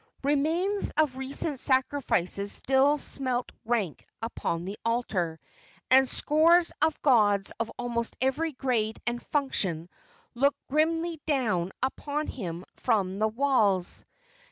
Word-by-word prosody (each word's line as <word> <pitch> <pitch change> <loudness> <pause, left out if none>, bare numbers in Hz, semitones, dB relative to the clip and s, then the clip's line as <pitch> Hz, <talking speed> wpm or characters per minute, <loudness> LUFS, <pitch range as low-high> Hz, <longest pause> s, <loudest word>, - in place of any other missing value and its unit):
Remains 320 +8 0
of 305 -4 +2
recent 270 +2 -1
sacrifices 250 -8 +1
still 270 +3 +3
smelt 255 -3 -1
rank 220 -9 -1 0.2
upon 175 -7 -3
the 200 +3 -6
altar, 195 -9 -1 0.5
and 265 0 +6
scores 335 +3 +4
of 315 0 +2
gods 205 -7 +3
of 230 0 -2
almost 235 -1 -3
every 270 +5 0
grade 235 -5 -1
and 240 0 -2
function 190 - -1 0.5
looked 280 +4 +2
grimly 325 +2 0
down 215 - 0
upon 290 +3 -2
him 180 - -6
from 200 -5 0
the 215 - +3
walls. 220 -7 +1
255 Hz, 115 wpm, -27 LUFS, 210-290 Hz, 0.5 s, and